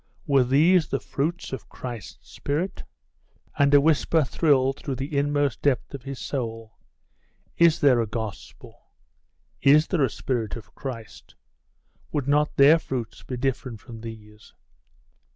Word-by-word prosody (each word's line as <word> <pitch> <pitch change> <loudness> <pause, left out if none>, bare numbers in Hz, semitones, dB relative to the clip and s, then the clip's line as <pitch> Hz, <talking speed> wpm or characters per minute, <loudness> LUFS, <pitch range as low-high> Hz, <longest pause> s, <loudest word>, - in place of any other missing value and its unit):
were 140 -3 +4
these 155 +6 +4
the 135 - -2
fruits 160 +2 -3
of 130 - -7
Christ's 115 - -8
Spirit?.... 165 +7 -3 0.8
And 140 0 +4
a 145 - +7
whisper 160 +1 +3
thrilled 135 -1 +2
through 135 - -4
the 135 +4 -5
inmost 145 -2 0
depth 140 -1 0
of 140 - -6
his 135 +1 -7
soul 115 -5 -5 0.8
'Is 170 -1 +4
there 130 -4 +5
a 115 - -2
Gospel? 110 -1 -7 0.8
Is 150 +3 +6
there 165 -5 0
a 130 - +2
Spirit 115 0 -3
of 115 - -11
Christ? 120 -6 -8 0.8
Would 145 -3 -2
not 150 +1 +2
their 145 +4 +7
fruits 125 -7 -5
be 125 - -6
different 125 -3 -2
from 115 -2 -11
these? 105 -2 -11
135 Hz, 140 wpm, -25 LUFS, 120-145 Hz, 0.8 s, a